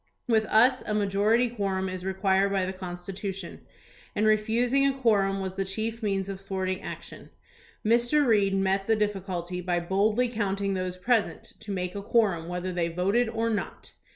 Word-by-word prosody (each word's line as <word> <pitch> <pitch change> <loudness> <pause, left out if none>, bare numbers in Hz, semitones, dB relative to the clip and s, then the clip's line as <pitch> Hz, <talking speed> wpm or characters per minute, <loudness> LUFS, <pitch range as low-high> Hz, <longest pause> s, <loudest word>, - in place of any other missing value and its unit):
With 220 -2 +3
us 245 +5 +4
a 210 - 0
majority 210 +4 +2
quorum 195 -5 -2
is 185 -1 -5
required 190 +1 +1
by 195 -2 +1
the 190 - -4
Constitution, 185 +1 -6 0.5
and 210 - +1
refusing 230 +5 +2
a 275 -1 -1
quorum 200 -6 +2
was 190 -1 -4
the 195 - +1
chief 220 +4 -3
means 195 -3 -1
of 195 -1 -6
thwarting 190 -1 -3
action. - - -9 0.6
Mr. 240 +6 +3
Reed 205 -5 +3
met 195 0 +1
the 225 - +4
difficulty 185 -4 -2
by 175 -1 0
boldly 210 +7 +1
counting 200 -4 -1
those 185 -1 -3
present 225 +3 0
to 210 - -8
make 180 -2 -3
a 200 - -5
quorum 195 -7 +1
whether 180 +1 -3
they 175 -1 0
voted 195 +8 +1
or 225 0 -1
not. 210 -2 -4
195 Hz, 170 wpm, -27 LUFS, 190-220 Hz, 0.6 s, us